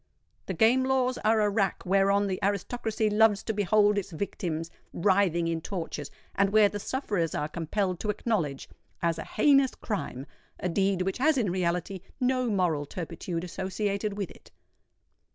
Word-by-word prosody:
The 190 - -3
Game 235 +8 +4
Laws 260 -1 +1
are 220 0 +3
a 210 - +3
rack 200 -2 0
whereon 195 +2 +3
the 190 -2 -2
aristocracy 215 +2 -1
loves 210 -1 +3
to 220 - -2
behold 205 +1 +3
its 200 - -7
victims 165 -2 -4 0.2
writhing 180 -2 +2
in 165 -1 -1
tortures, 165 -6 -5 0.2
and 195 0 +2
where 210 0 +5
the 205 - -5
sufferers 205 - -2
are 150 - -1
compelled 180 +4 -2
to 210 - -3
acknowledge 185 - -1 0.4
as 165 -1 +1
a - - -4
heinous 275 +2 +3
crime 140 - -4 0.3
a 180 - -1
deed 190 +1 +1
which 195 +5 -2
has 305 +2 +3
in 215 -8 +1
reality 180 +1 -1 0.2
no 255 -1 +1
moral 175 -8 0
turpitude 170 +1 -5
associated 200 +3 -2
with 200 -4 -3
it. - - -17
195 Hz, 160 wpm, -28 LUFS, 175-215 Hz, 0.4 s, where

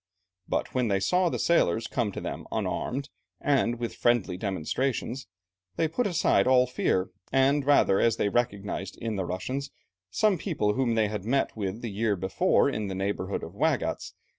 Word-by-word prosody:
But - - -2
when 125 -2 +1
they 100 -2 +1
saw 180 - +2
the - - -2
sailors 115 - +2
come 115 -4 -1
to - - -4
them - - -6
unarmed 135 +2 -2 0.3
and 130 -4 +1
with 120 0 -4
friendly 120 -6 +1
demonstrations, 115 - -2 0.5
they 160 - +1
put 235 +10 0
aside 155 - +2
all 130 -1 +5
fear, 95 -7 0 0.2
the 135 +2 +3
rather 135 -8 +4
as 115 -1 +3
they - - +1
recognized 100 -4 -2
in 115 -2 -3
the 95 -2 -2
Russians 130 +11 -3 0.4
some 195 - +2
people 140 - 0
whom 120 -1 +1
they 110 -1 +3
had 105 -2 -4
met 135 +6 0
with 105 +1 -4
the 115 - -3
year 105 +1 0
before 95 +1 +2
in 105 -1 -2
the 95 - -4
neighbourhood 95 0 -2
of 80 - -7
Waigatz. 115 - -1
115 Hz, 175 wpm, -27 LUFS, 100-135 Hz, 0.5 s, all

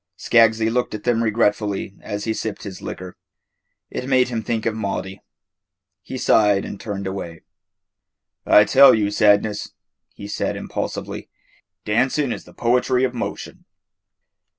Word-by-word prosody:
Skaggsy 115 -1 +3
looked 125 -3 -1
at 105 - -8
them 120 -1 +1
regretfully 105 -3 0
as 105 0 -5
he 110 - -1
sipped 110 -2 -5
his 100 -3 -8
liquor. 90 -1 -7 0.8
It 125 - -5
made 130 -2 +3
him 115 -2 -2
think 110 0 -3
of 115 - +1
Maudie. 100 -2 -4 0.8
He - - -7
sighed 105 -3 +3
and 100 - -7
turned 100 -2 -5
away. 95 -4 -6 1.0
"I 105 - +6
tell 135 +2 +7
you, 105 -2 0
Sadness," 105 0 +2 0.4
he 100 - -8
said - - -2
impulsively, - - -5 0.6
"dancing 130 +5 +1
is - - -6
the - - -15
poetry 125 +2 +1
of 130 -1 0
motion." 120 - -6
110 Hz, 140 wpm, -21 LUFS, 100-120 Hz, 1.0 s, tell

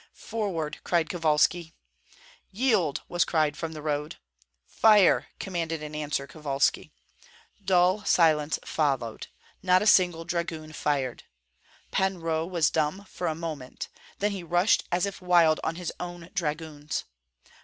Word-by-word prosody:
"Forward!" 175 -9 -3
cried 170 -2 +1
Kovalski. 165 0 +1 0.8
"Yield!" 205 - +1
was 175 0 +2
cried 155 -3 +1
from 165 -1 -5
the 155 -1 -8
road. 150 0 -2 0.5
"Fire!" 210 -4 +4
commanded 165 -4 -3
in 150 0 -7
answer 150 -2 -2
Kovalski. 140 -2 -1 0.7
Dull 185 +2 +3
silence 155 -3 +3
followed, 135 -7 -1 0.3
not 185 +1 +4
a - - -2
single 175 -5 +4
dragoon 165 -2 -4
fired. 140 -5 -2 0.7
Pan 190 0 +1
Roh 165 0 -1
was 170 -4 +1
dumb 160 +6 -1
for 175 - -3
a 160 - -1
moment; 155 -6 -6 0.3
then 205 +1 0
he 195 -2 -4
rushed 175 +4 +2
as 175 +2 +2
if 200 -1 -6
wild 170 -3 +4
on 165 - -1
his 175 -1 -5
own 175 -1 -7
dragoons. 155 -4 -3
165 Hz, 135 wpm, -27 LUFS, 150-180 Hz, 0.8 s, Fire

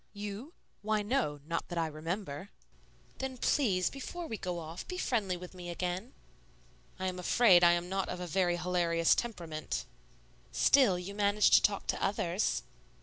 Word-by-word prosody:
"You? 210 - -6 0.3
Why, 215 0 0
no, 205 - -1
not 165 +1 -3
that 175 - -5
I 165 - +2
remember." 160 +2 -5 0.7
"Then, 265 -1 -4
please, 200 -11 +2
before 335 +6 -6
we 225 - -4
go 180 -3 -4
off, 165 +1 -7
be 365 - -5
friendly 205 - 0
with 180 +1 -10
me 180 -1 -8
again." 180 +7 -3 0.8
"I 190 - -4
am 185 -1 -2
afraid 180 -1 +5
I 175 0 +7
am 175 0 -1
not 195 +1 -2
of 180 - -4
a 180 - -4
very 175 +1 +1
hilarious 170 -1 +2
temperament." 170 -10 -3 0.7
"Still, 255 -10 +4
you 180 +3 -6
manage 205 0 +3
to - - +8
talk 200 -1 +1
to - - -2
others." 195 -1 0
185 Hz, 165 wpm, -32 LUFS, 175-210 Hz, 0.8 s, to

